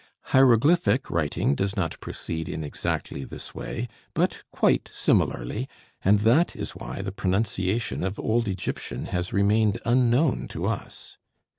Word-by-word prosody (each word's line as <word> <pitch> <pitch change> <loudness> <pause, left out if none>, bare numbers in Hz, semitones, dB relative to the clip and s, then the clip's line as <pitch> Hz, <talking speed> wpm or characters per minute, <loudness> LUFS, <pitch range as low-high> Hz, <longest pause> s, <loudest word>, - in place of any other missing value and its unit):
Hieroglyphic 135 +3 +4
writing 75 -3 +1
does 100 +7 -1
not 85 -4 -1
proceed 80 -1 -5
in 80 - -4
exactly 70 -1 -3
this - - -9
way, 120 +2 -4 0.3
but - - +1
quite - - +2
similarly, 105 - 0 0.3
and 100 +2 +4
that 125 +11 +4
is - - -5
why 95 - -6
the 95 - -3
pronunciation 95 +2 -1
of 95 +2 -3
old 115 0 +1
Egyptian 95 -1 -4
has 90 0 -2
remained 105 +1 +3
unknown 125 +4 +3
to - - -4
us. - - -5
105 Hz, 135 wpm, -26 LUFS, 95-120 Hz, 0.3 s, Hieroglyphic